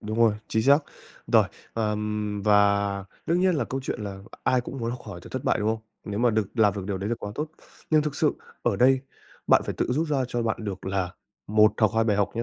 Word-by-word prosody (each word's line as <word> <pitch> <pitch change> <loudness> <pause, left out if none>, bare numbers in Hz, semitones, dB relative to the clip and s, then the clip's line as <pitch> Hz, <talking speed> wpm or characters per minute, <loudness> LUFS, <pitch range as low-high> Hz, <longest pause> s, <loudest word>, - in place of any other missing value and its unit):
Đúng 110 +2 -4
rồi, 115 -3 +5
chính 110 - +1
xác. 140 +3 +6 0.5
Rồi, - - +5 0.3
ờm. 105 -1 -2
Và 100 -1 +3 0.2
đương 170 +2 +2
nhiên 185 -1 +3
là 145 - 0
câu 135 - -4
chuyện 130 - -4
là 100 -2 -5 0.3
ai 130 -1 +3
cũng 130 +2 -7
muốn 115 -1 -2
khỏi 100 -5 -8
từ - - -11
thất - - -4
bại, - - +2
đúng 105 - 0
không? 110 0 -1 0.2
Nếu 105 -1 -4
mà 120 +1 +4
được 110 -2 +1
làm 105 -4 +4
được 100 -2 -4
điều 100 -2 -2
đấy 100 - -3
là 120 - +1
quá 105 - -6
tốt. 150 +1 -3 0.4
Nhưng 155 -1 +5
thực 150 -1 -3
sự 150 0 +2 0.3
ở 120 -4 +1
đây, 130 +4 +5 0.5
bạn - - +5
phải - - -3
tự - - +1
rút 155 +6 0
ra 135 -3 +1
cho 120 -1 -1
bạn 110 -1 0
được 95 -2 -5
là 95 -2 -1 0.4
1 105 0 +5
hoặc 110 - +5
2 115 0 +3
bài 105 -3 +2
học 100 -1 +2
nhé. 115 - 0
110 Hz, 250 wpm, -26 LUFS, 105-125 Hz, 0.5 s, xác